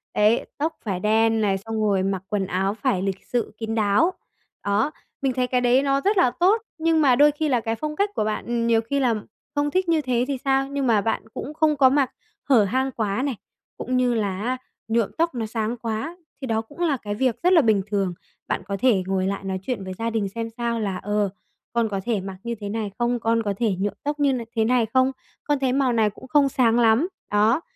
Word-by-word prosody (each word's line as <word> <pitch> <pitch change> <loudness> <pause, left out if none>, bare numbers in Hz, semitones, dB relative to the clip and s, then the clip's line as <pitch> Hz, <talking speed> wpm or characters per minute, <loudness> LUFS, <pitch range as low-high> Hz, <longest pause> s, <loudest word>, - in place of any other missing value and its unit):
Đấy, 210 +3 +3
tóc 315 +2 -2
phải 190 -4 -2
đen 225 +2 +2
này, 195 -2 +2
xong 220 +2 -4
rồi 200 -3 +2
mặc 190 -1 -1
quần 205 -2 0
áo 190 +2 0
phải 195 -3 0
lịch 195 0 -3
sự 240 -3 -2
kín 225 0 -3
đáo. 215 - +3 0.5
Đó, 205 +8 +1 0.3
mình 270 -2 +1
thấy 250 0 0
cái 250 0 +1
đấy 250 +2 +4
nó 275 0 +1
rất 405 +4 +1
là 300 -9 +4
tốt, 395 +6 +3 0.2
nhưng 325 0 +2
mà 265 -4 +5
đôi 295 +3 +6
khi 300 +1 -2
là 245 -3 +2
cái 225 0 -2
phong 300 +5 -4
cách 400 +5 +1
của - - +1
bạn, 215 0 -2
ừm, 235 -1 -1
nhiều 225 -1 +4
khi 280 +5 -2
là 245 -4 +2 0.4
không 290 0 +1
thích 370 +1 0
như 325 -2 +3
thế 250 -3 0
thì 275 -2 -1
sao? 270 0 +2
Nhưng 275 -2 -2
mà 220 -3 +4
bạn 225 +3 -1
cũng 285 - -6
không 310 -1 +2
có 265 -2 +6
mặc 270 -1 +2 0.3
hở 255 -7 +5
hang 260 +7 0
quá 215 -1 -1
này, 275 -4 -1 0.4
cũng 255 0 -1
như 250 -1 +2
là 200 -4 -1
á, 250 +4 -1 0.3
nhuộm 225 -2 +1
tóc 335 -3 +1
nó 230 -2 -2
sáng 220 +1 -2
quá, 230 +9 -4 0.2
thì 265 - -4
đó 220 -1 0
cũng 260 +8 -17
là 325 -6 +1
cái 205 -3 -5
việc 255 +5 0
rất 360 - +5
là 335 - +7
bình 215 -6 +3
thường. 195 -3 0 0.3
Bạn - - -1
có 200 0 -2
thể 215 -5 +3
ngồi 190 -1 0
lại 200 0 -3
nói 190 -1 -3
chuyện 235 -3 -3
với 185 0 -5
gia 230 0 -1
đình 220 -3 -1
xem 230 +3 -4
sao 235 -1 -1
là, 200 -4 -2
ờ, 205 +1 0 0.4
con 235 -2 +1
có 195 -2 -2
thể 225 -5 0
mặc 190 0 -7
như 235 0 -3
thế 205 -2 -6
này 215 -1 -3
không? 240 0 +1
Con 230 0 +1
có 205 - -1
thể 220 -4 +1
nhuộm 200 +1 -1
tóc 295 +1 -2
như 280 -2 +3
n 255 - 0 0.2
thế 220 -1 +2
này 245 0 +3
không? 260 0 +4 0.3
Con 290 -2 +1
thấy 260 -2 +1
màu 265 -2 +2
này 220 -2 +3
cũng 235 +5 -13
không 280 +1 +4
sáng 240 -2 +3
lắm. 230 +7 +4 0.2
Đó, 215 +7 +3
230 Hz, 250 wpm, -23 LUFS, 210-270 Hz, 0.5 s, là